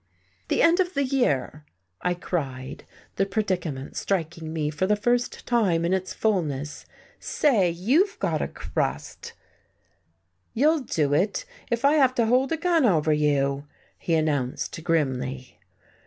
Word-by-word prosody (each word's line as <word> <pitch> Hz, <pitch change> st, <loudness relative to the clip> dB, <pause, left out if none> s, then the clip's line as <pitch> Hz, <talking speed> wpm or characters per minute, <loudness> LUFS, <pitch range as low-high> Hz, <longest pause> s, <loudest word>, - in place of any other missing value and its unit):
"The -, -, +2 dB
end 335 Hz, +2 st, +5 dB
of 365 Hz, 0 st, 0 dB
the 280 Hz, -, +2 dB
year!" 155 Hz, -, 0 dB, 0.4 s
I 180 Hz, 0 st, 0 dB
cried, 135 Hz, -7 st, -4 dB, 0.3 s
the 195 Hz, -, +2 dB
predicament 180 Hz, -9 st, -2 dB
striking 165 Hz, -4 st, -2 dB
me 155 Hz, -2 st, -1 dB
for 170 Hz, +5 st, -1 dB
the 210 Hz, -, +3 dB
first 240 Hz, +4 st, -1 dB
time 190 Hz, -9 st, +2 dB
in 175 Hz, -, +1 dB
its 185 Hz, 0 st, -1 dB
fulness. 150 Hz, -9 st, -2 dB, 0.3 s
"Say, 220 Hz, -, +2 dB
you've 260 Hz, -, +1 dB
got -, -, -1 dB
a -, -, -1 dB
crust!" -, -, -4 dB, 1.2 s
"You'll 305 Hz, +7 st, +3 dB
do 155 Hz, -, 0 dB
it, 205 Hz, -, +1 dB, 0.2 s
if 235 Hz, +3 st, 0 dB
I 285 Hz, -, +5 dB
have 260 Hz, -3 st, +4 dB
to 235 Hz, -, +2 dB
hold 255 Hz, +4 st, +2 dB
a 325 Hz, -, +1 dB
gun 335 Hz, -1 st, +2 dB
over 160 Hz, -9 st, +3 dB
you," 145 Hz, -1 st, +1 dB, 0.3 s
he 165 Hz, -, 0 dB
announced 155 Hz, +1 st, -1 dB
grimly. 130 Hz, -5 st, -2 dB
180 Hz, 140 wpm, -25 LUFS, 150-245 Hz, 1.2 s, end